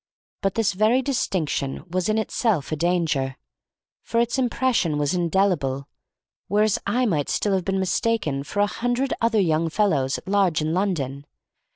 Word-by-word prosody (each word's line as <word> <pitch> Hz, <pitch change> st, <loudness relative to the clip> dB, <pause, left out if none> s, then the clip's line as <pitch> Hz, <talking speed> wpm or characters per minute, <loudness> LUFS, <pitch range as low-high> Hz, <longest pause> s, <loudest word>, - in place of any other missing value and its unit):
But 195 Hz, -2 st, 0 dB
this 225 Hz, -2 st, +1 dB
very 220 Hz, +7 st, +3 dB
distinction 175 Hz, -, -1 dB
was 185 Hz, +2 st, -1 dB
in 215 Hz, -, +2 dB
itself 215 Hz, -, 0 dB
a -, -, +1 dB
danger, 155 Hz, -5 st, 0 dB, 0.7 s
for 230 Hz, -, -1 dB
its 240 Hz, +3 st, +1 dB
impression 245 Hz, -, +1 dB
was 145 Hz, +1 st, 0 dB
indelible, 170 Hz, -6 st, 0 dB, 0.6 s
whereas 210 Hz, +1 st, +2 dB
I 245 Hz, +5 st, +1 dB
might 155 Hz, -, 0 dB
still 205 Hz, -, 0 dB
have 185 Hz, -2 st, 0 dB
been 195 Hz, 0 st, 0 dB
mistaken 185 Hz, -6 st, 0 dB
for 205 Hz, +8 st, -2 dB
a -, -, +5 dB
hundred 245 Hz, +5 st, -1 dB
other 230 Hz, -1 st, +2 dB
young 165 Hz, -3 st, +1 dB
fellows 155 Hz, -8 st, +1 dB
at -, -, -13 dB
large 195 Hz, -5 st, +2 dB
in 155 Hz, +1 st, -1 dB
London. 145 Hz, -8 st, -2 dB
190 Hz, 160 wpm, -23 LUFS, 155-215 Hz, 0.7 s, a